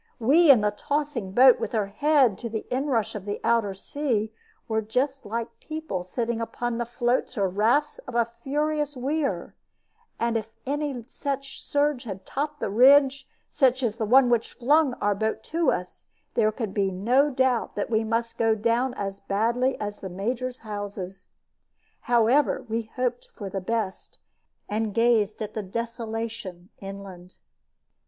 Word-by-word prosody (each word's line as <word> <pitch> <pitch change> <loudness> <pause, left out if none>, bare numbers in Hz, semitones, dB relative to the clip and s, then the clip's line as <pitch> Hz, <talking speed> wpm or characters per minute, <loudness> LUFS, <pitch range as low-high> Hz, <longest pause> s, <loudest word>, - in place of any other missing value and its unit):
We 290 +8 +5
in 255 -6 +8
the 210 0 +2
tossing 285 -4 -2
boat, 255 +2 +7
with - - -4
her 215 -3 +1
head 270 +1 +3
to 235 - -4
the 220 -1 -4
inrush 255 -4 0
of 205 -3 -6
the 205 0 -3
outer 225 -4 +2
sea, 220 -1 -2 0.3
were 220 -2 0
just 260 +4 -1
like 230 +2 -4
people 310 - -4
sitting 230 +5 -2
upon 240 +1 -3
the 235 - -2
floats 240 +1 0
or 200 -2 +2
rafts 225 +10 +1
of 250 - -7
a 235 -1 +4
furious 290 +5 -2
weir; 280 +3 -2 0.7
and 235 0 +1
if 220 -1 -4 0.2
any 280 -3 -2
such 275 0 -4
surge 290 -3 0
had 195 -3 -7
topped 295 +2 -3
the - - -2
ridge 270 +4 +5 0.3
as 255 -4 +3
the 225 - -1
one 250 +2 +6
which 235 -1 +1
flung 280 +1 +3
our 205 0 +1
boat 220 +2 -2
to 335 0 +3
us, 180 0 -4 0.3
there 215 0 +3
could 215 -3 -4
be 200 -2 +1
no 240 +10 +2
doubt 260 -3 +1
that 205 - -3
we 220 0 +2
must 230 +1 -2
go 225 -1 +3
down 235 +4 +1
as 195 -1 -4
badly 235 +7 0
as 205 0 -4
the 190 - -6
Major's 240 +7 -3
houses. 200 -2 -6 0.8
However, 245 +5 +3
we 225 0 -3
hoped 250 -1 -1
for 200 -3 -6
the 195 - -3
best, 210 -1 -3 0.5
and 215 -1 -2
gazed 225 -2 +2
at 210 0 -6
the 215 - -2
desolation 225 -3 -5
inland. 195 -2 -9
230 Hz, 160 wpm, -26 LUFS, 210-265 Hz, 0.8 s, in